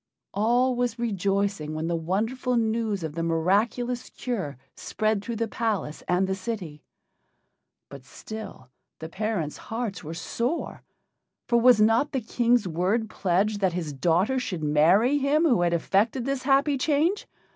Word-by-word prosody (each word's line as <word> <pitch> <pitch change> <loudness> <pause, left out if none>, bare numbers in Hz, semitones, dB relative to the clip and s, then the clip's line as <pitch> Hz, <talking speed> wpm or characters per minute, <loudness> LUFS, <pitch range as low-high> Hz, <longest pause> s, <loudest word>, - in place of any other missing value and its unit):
All 245 +5 +2
was 245 -1 -1
rejoicing 200 -7 -1
when 155 +1 -3
the 170 0 -1
wonderful 225 +9 -1
news 220 -4 0
of 155 -2 -4
the 165 - -3
miraculous 205 +9 0
cure 190 - -4 0.2
spread 215 -2 -1
through 235 +2 -4
the 225 +1 -1
palace 215 -9 -2
and 180 +2 +2
the 190 - -1
city. 185 -7 -5 1.1
But 140 -2 -11
still 170 -5 -9 0.3
the 160 - -8
parents' 190 -6 -3
hearts 225 -4 -3
were 160 +2 -6
sore, 240 - -3 0.7
for 235 -1 +3
was 245 -2 +6
not 225 +7 +3
the 265 - +1
King's 240 -1 +1
word 190 +7 0
pledged 200 +3 0
that 190 -3 +1
his 165 -4 -3
daughter 175 - +1
should 180 -10 -4
marry 180 - +4
him 285 +3 +2
who 250 - +3
had 175 -1 +2
effected 210 +8 +1
this 275 -1 -1
happy 275 +1 +2
change? 315 +8 +1
215 Hz, 150 wpm, -26 LUFS, 175-240 Hz, 1.1 s, was